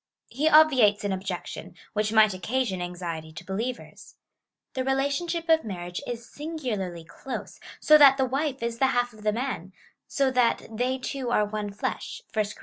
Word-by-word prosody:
He 295 +6 +1
obviates 265 -11 +5
an 205 - -1
objection, 185 -1 -5 0.2
which 210 0 0
might 215 -2 +5
occasion 190 +1 -1
anxiety 170 -3 -5
to 155 - -10
believers. 230 +6 -5 0.6
The 260 - -1
relationship 285 +6 -1
of 320 -1 +4
marriage 175 -3 -5
is 235 -1 -5
singularly 245 - -4
close, 260 +10 -7 0.2
so 305 0 +6
that 275 -2 +8
the 265 - +2
wife 270 0 -2
is 235 0 -3
the 265 - +4
half 245 -1 +1
of 215 - -15
the 210 0 +1
man 220 -6 -4 0.2
— - - -48
so 275 -2 +3
that 250 -2 +2
they 250 +4 -1
two 260 -1 -4
are 210 -3 +3
one 205 0 -4
flesh 200 - -4
— - - -35
(1 215 -1 +1
Cor. - - -18
235 Hz, 180 wpm, -26 LUFS, 200-270 Hz, 0.6 s, that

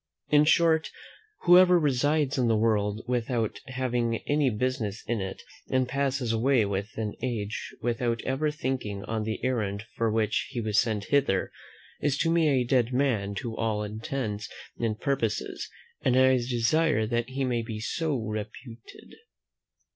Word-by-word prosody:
In 150 0 +5
short, 160 0 +3 0.5
whoever 180 0 +7
resides 145 -1 +1
in 125 - +2
the 115 -1 +3
world 105 -1 +1
without 120 -2 -1
having 125 -3 -1
any 145 -2 +3
business 115 -2 -2
in 115 -3 -1
it, 95 0 -6 0.3
and 130 -1 +1
passes 135 -2 -1
away 120 +2 +3
an 105 +3 -3
age 110 -4 -3
without 120 0 0
ever 135 +4 0
thinking 125 -9 -3
on 110 0 -3
the 110 0 -3
errand 105 -5 -1
for 115 -1 +1
which 110 -1 0
he 120 - -4
was 110 -2 +1
sent 110 -3 -1
hither, 140 -10 +2 0.5
is 145 -2 +1
to 165 - +1
me 165 -2 +3
a 130 -3 +3
dead 125 -1 +2
man 120 -7 0
to 110 +3 -4
all 110 -2 -1
intents 105 0 -4 0.3
and 110 -2 -1
purposes, 125 -6 -2 0.3
and 130 -1 +2
I 130 0 +6
desire 120 +2 +1
that 120 +2 -1
he 135 +1 -2
may 120 -2 0
be 110 -1 -6
so 155 +7 -1
reputed. 110 +2 -7
120 Hz, 150 wpm, -27 LUFS, 110-135 Hz, 0.5 s, whoever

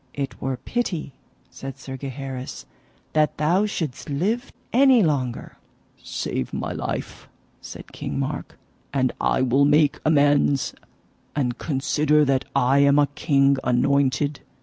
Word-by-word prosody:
it 140 -1 -4
were 135 -1 -2
pity, 175 - -3 0.4
said 135 0 -8
Sir 135 0 -8
Gaheris, 130 -1 -6 0.5
that 155 -1 +2
thou 175 +8 +2
shouldst 160 -7 -4
live 210 - -1 0.2
any 260 -2 +6
longer. 130 -7 -2 0.4
Save 65 - -4
my - - -3
life, - - -5 0.3
said - - -10
King - - -5
Mark, - - -4 0.3
and 130 -2 +1
I 130 - +2
will 130 +2 +3
make 145 0 +3
amends; 145 -2 +3 0.6
and 125 -4 -1
consider 150 +1 +2
that 135 -1 +1
I 135 +1 +3
am 140 0 +5
a 145 -1 +4
king 140 -2 +3
anointed. 140 +3 +1
140 Hz, 125 wpm, -23 LUFS, 135-150 Hz, 0.6 s, any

